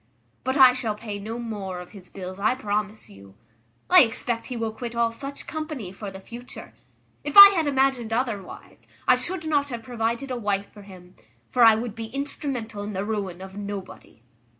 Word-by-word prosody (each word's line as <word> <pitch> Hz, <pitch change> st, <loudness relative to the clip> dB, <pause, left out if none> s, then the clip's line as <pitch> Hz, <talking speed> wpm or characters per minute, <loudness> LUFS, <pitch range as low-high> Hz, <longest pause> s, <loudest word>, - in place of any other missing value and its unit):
but 260 Hz, +2 st, -1 dB
I 260 Hz, -2 st, +8 dB
shall 235 Hz, -4 st, -2 dB
pay 210 Hz, -1 st, -6 dB
no 220 Hz, +3 st, -5 dB
more 205 Hz, -6 st, -5 dB
of 180 Hz, -, -11 dB
his 185 Hz, -4 st, -10 dB
bills, 185 Hz, 0 st, -8 dB
I 215 Hz, +5 st, +2 dB
promise 210 Hz, -3 st, -3 dB
you. 100 Hz, 0 st, -15 dB, 0.5 s
I -, -, +8 dB
expect 230 Hz, +1 st, -1 dB
he 250 Hz, -, -5 dB
will 225 Hz, -1 st, -2 dB
quit 235 Hz, +1 st, -6 dB
all 235 Hz, -1 st, +2 dB
such 275 Hz, +4 st, -7 dB
company 305 Hz, -, -5 dB
for 200 Hz, +1 st, -7 dB
the 190 Hz, 0 st, -10 dB
future. 235 Hz, +5 st, -11 dB, 0.5 s
If 295 Hz, -, -2 dB
I 400 Hz, 0 st, +14 dB
had 335 Hz, -6 st, 0 dB
imagined 265 Hz, -4 st, +1 dB
otherwise, 225 Hz, -4 st, -4 dB, 0.2 s
I 255 Hz, -, +7 dB
should 320 Hz, +7 st, -3 dB
not 290 Hz, -2 st, +1 dB
have 235 Hz, -3 st, -6 dB
provided 235 Hz, +3 st, -2 dB
a 250 Hz, -, -2 dB
wife 205 Hz, -3 st, -2 dB
for 205 Hz, -, -12 dB
him; 185 Hz, -2 st, -14 dB, 0.4 s
for 245 Hz, -, +4 dB
I 225 Hz, -1 st, +8 dB
would 225 Hz, 0 st, -4 dB
be 225 Hz, 0 st, -6 dB
instrumental 255 Hz, -4 st, -4 dB
in 205 Hz, +1 st, -5 dB
the 195 Hz, +1 st, -3 dB
ruin 200 Hz, -5 st, -4 dB
of 190 Hz, 0 st, -10 dB
nobody." 200 Hz, -, -8 dB
225 Hz, 195 wpm, -25 LUFS, 200-255 Hz, 0.5 s, I